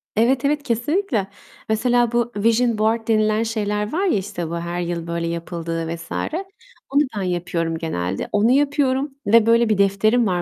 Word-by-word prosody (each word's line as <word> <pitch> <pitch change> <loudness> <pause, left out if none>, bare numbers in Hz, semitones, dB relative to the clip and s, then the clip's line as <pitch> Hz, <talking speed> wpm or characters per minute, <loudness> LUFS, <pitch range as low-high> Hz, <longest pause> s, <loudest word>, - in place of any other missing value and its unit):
Evet, 245 +5 +2
evet, 295 +1 +1
kesinlikle. 240 - 0 0.4
Mesela, 240 +2 +2
bu 240 0 0
vision 230 +2 +2
board 225 +1 0
denilen 215 0 +2
şeyler 210 -1 -2
var 370 +5 0
ya, 350 - +2
işte 175 -4 -4
bu 170 - -3
her 170 +1 -3
yıl 170 -1 -3
böyle 170 0 -2
yapıldığı 165 -1 -4
vs. 165 - -12 0.8
Onu 280 +2 +3 0.2
ben - - -1
yapıyorum 175 -2 -2
genelde. 95 - -3
Onu 210 +3 +3
yapıyorum 280 0 +1
ve 225 +1 +5
böyle 230 0 +4
bir 215 - +2
defterim 210 +4 +3
var 180 -2 0
215 Hz, 165 wpm, -21 LUFS, 175-240 Hz, 0.8 s, ve